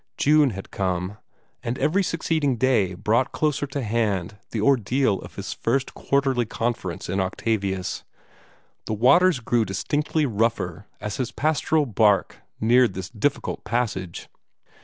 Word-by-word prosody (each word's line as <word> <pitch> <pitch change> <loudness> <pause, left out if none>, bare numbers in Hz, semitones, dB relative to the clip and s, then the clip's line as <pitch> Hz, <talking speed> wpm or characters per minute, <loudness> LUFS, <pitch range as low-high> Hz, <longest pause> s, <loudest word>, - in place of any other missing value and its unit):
June 150 -1 +4
had 100 -4 -8
come; 95 +1 -2 0.4
and 120 +2 -3
every 185 +6 +2
succeeding 160 -6 0
day 110 -7 +2
brought 110 +7 +1
closer 150 -2 0
to 135 0 -4
hand 105 -5 -1
the 115 - -3
ordeal 120 -2 +2
of - - -11
his - - -5
first 135 +3 -1
Quarterly 135 -3 +1
Conference 110 -7 -3
in 95 - -1
Octavius. 95 -1 -2 0.8
The 110 - -1
waters 140 - +5
grew 120 0 +1
distinctly 145 - -1
rougher 105 - -1
as 105 -1 -4
his 130 -3 -2
pastoral 155 0 +1
bark 105 -4 +2 0.2
neared 120 -1 +4
this 95 -1 -5
difficult 130 +6 -1
passage. 105 -8 -2
115 Hz, 135 wpm, -24 LUFS, 100-140 Hz, 0.8 s, waters